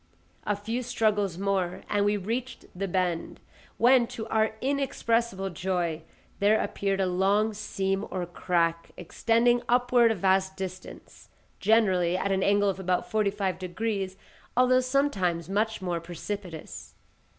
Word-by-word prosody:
A 205 - +2
few 225 +5 -3
struggles 210 -6 0
more, 190 -2 -1
and 205 -1 +1
we 205 +1 +2
reached 235 +5 -4
the 195 +2 -3
bend, 180 -2 -1 0.4
when 245 0 +5
to 225 - -6
our 220 0 +1
inexpressible 235 -7 0
joy, 170 -2 -2 0.4
there 210 +2 +4
appeared 195 -1 -1
a 190 - +2
long 195 +4 +2
seam 195 -1 -2
or 185 -2 -3
crack 170 -1 -1
extending 230 +7 +2
upward 245 -1 +4
a - - 0
vast 190 0 +1
distance, 185 -1 -8 0.3
generally 190 -5 +3
at 195 +1 -1
an 190 0 +1
angle 205 +1 +3
of 195 -1 -1
about 185 -1 -1
forty 215 -2 +2
five 195 -2 -2
degrees, 190 +1 -3 0.4
although 255 0 +5
sometimes 230 - 0
much 210 +1 -1
more 175 -2 -1
precipitous. 175 0 -7
195 Hz, 140 wpm, -27 LUFS, 185-225 Hz, 0.4 s, when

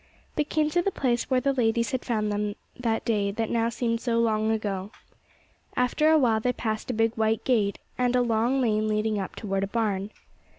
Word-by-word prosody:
They 300 - +2
came 305 +1 0
to 350 - +2
the 395 - +1
place 245 -9 -1
where 255 -1 +2
the 275 +1 +1
ladies 235 0 +1
had 260 -2 -2
found 215 -3 -1
them 205 0 -1 0.2
that 230 -3 -1
day 205 -3 +1
that 220 +2 -2
now 230 0 +1
seemed 235 -1 -1
so 235 -2 0
long 220 -1 +2
ago. 205 -3 -2 0.9
After 250 +5 +3
a 315 - +6
while 235 -6 +3
they 250 +3 0
passed 220 -1 -3
a - - 0
big 225 0 +2
white 220 -1 0
gate, 210 -6 +1 0.2
and 250 0 +2
a 250 - +4
long 235 +3 +1
lane 215 -3 +1
leading 215 0 0
up 190 - -5
toward 195 -2 -2
a - - -1
barn. 205 -2 -1
225 Hz, 210 wpm, -26 LUFS, 215-250 Hz, 0.9 s, a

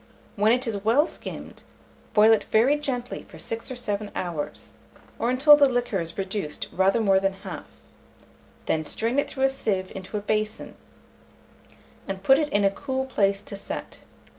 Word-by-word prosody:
When 210 +2 +3
it 250 +2 +2
is 205 -4 -3
well 240 +8 +4
skimmed, - - -9 0.5
boil 215 +1 +7
it 220 - +1
very 245 +7 +4
gently 255 -4 -3
for - - -12
6 225 +3 -4
or 255 - -5
7 210 -4 -3
hours, 170 -5 -4 0.5
or 235 - +1
until 275 +4 +7
the 285 -2 +5
liquor 245 -5 0
is 165 0 -7
reduced 195 -5 -3
rather 190 +4 +2
more 195 -3 +4
than 195 0 0
half; - - -7 1.0
then 155 - 0
strain 235 +5 0
it - - -1
through 265 - -3
a 270 - +5
sieve 200 -8 -2
into 190 +2 -5
a - - -3
basin, 215 +1 -2 1.3
and 195 -1 -5
put 270 +6 +6
it 300 -1 0
in 205 -6 +2
a 195 - +4
cool 265 +4 -3
place 200 -6 +1
to - - -8
set. 200 - -6
215 Hz, 175 wpm, -25 LUFS, 195-255 Hz, 1.3 s, boil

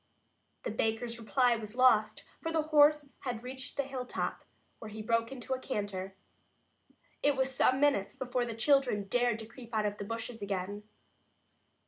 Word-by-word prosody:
The - - -2
baker's 225 +2 -1
reply 245 +2 +3
was 220 0 -6
lost, 220 -4 +4 0.2
for 325 - -2
the 320 -1 +1
horse 300 -1 +4
had 245 -4 -4
reached 260 +1 -7
the 280 - +2
hilltop, 260 -2 -4 0.4
where 220 - -8
he 215 +1 -8
broke 230 +1 +1
into 265 0 -4
a 260 - -2
canter. 200 -6 -4 1.1
It 290 -1 +3
was 265 0 +1
some 260 +1 +3
minutes 275 -9 +2
before 250 -1 -1
the 230 -2 -5
children 250 -3 +3
dared 240 +2 +1
to 225 - -7
creep 235 0 -10
out 215 -1 +2
of 205 0 -2
the - - -3
bushes 230 +1 -5
again. 200 +1 -3
235 Hz, 165 wpm, -32 LUFS, 215-265 Hz, 1.1 s, lost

